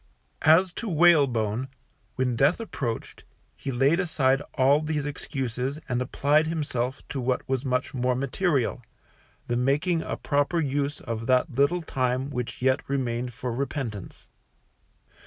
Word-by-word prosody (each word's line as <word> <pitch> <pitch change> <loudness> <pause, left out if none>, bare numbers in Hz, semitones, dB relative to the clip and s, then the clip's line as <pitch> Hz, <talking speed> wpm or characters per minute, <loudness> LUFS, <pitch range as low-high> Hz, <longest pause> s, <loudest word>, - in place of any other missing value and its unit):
As 165 +3 +5
to 230 - -3
Whalebone, 135 - +3 0.5
when 125 -2 0
death 140 - +3
approached, 135 - -5 0.3
he 135 - -5
laid 135 +7 +3
aside 140 -7 +2
all 140 +2 +4
these 155 -2 -2
excuses 135 -2 -3
and 125 -2 -1
applied 145 +4 +2
himself 140 -5 -2
to 135 - -3
what 125 0 -1
was 130 -1 -1
much 125 -1 -1
more 125 -1 +1
material, 135 -1 0 0.6
the 120 - -1
making 150 +7 +1
a - - -4
proper 145 +4 +1
use 145 -1 -1
of 115 -1 -4
that 130 +4 +3
little 140 +7 +2
time 130 -1 -1
which 125 -1 -4
yet 130 0 +3
remained 125 -3 -2
for 125 +1 -4
repentance. 120 - -5
135 Hz, 140 wpm, -26 LUFS, 125-150 Hz, 0.6 s, As